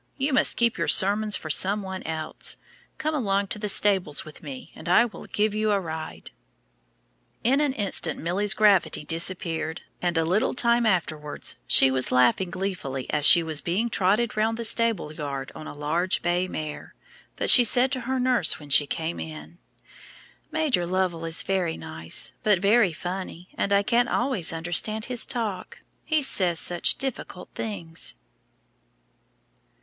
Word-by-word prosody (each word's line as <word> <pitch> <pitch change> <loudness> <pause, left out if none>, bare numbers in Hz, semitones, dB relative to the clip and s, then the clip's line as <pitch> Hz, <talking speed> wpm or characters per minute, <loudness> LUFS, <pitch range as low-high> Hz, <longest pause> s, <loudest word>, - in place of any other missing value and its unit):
You 275 +1 -1
must - - +2
keep 235 0 +1
your - - -1
sermons 210 +2 +3
for 155 - -5
some 200 +6 +2
one 190 -1 -6
else. 160 -1 -5 0.4
Come 310 +1 -2
along 200 -8 -1
to 235 - -3
the 210 - -2
stables 190 -7 +3
with 155 - -13
me, 135 -4 -9
and 165 - -9
I 235 +7 +5
will 235 - -10
give 210 0 -1
you 215 0 0
a 200 - +2
ride." 160 - -7 1.1
In 265 +5 +2
an 295 -3 +1
instant 195 - -3
Milly's 200 +5 -1
gravity 200 -7 +2
disappeared, 165 -1 -2 0.2
and 175 -2 -1
a 165 - +1
little 205 +11 0
time 235 -1 +2
afterwards 155 -6 -1
she 135 - +6
was 130 -1 -1
laughing 125 +9 +2
gleefully 175 -9 -5
as 150 0 +3
she 170 - +9
was 160 -2 0
being 210 +7 -2
trotted 210 +5 +1
round 220 +1 0
the 235 - -2
stable 225 -9 0
yard 140 -3 -6
on 155 - -10
a - - -9
large 165 +5 -1
bay 175 +1 0
mare; 155 -4 -7 0.4
but - - +5
she 245 - +10
said 245 +3 +4
to 260 -2 -3
her 260 0 0
nurse 250 -8 +1
when 145 -2 -12
she 145 +1 +7
came 165 +2 -4
in, 160 +2 -9 0.9
"Major 300 - 0
Lovell 180 -2 -1
is 165 0 0
very 185 -4 -1
nice, 80 0 -6
but 210 -3 +3
very 200 +1 +3
funny, 180 +1 -7
and 200 - -2
I 200 0 +3
can't 240 +3 +1
always 245 -9 -1
understand 175 +7 0
his 245 -2 0
talk, 225 -6 -5 0.2
he 310 -2 0
says 180 -10 +1
such 175 -1 +1
difficult 260 -8 -5
things." 170 -7 -4
185 Hz, 165 wpm, -25 LUFS, 160-220 Hz, 1.1 s, she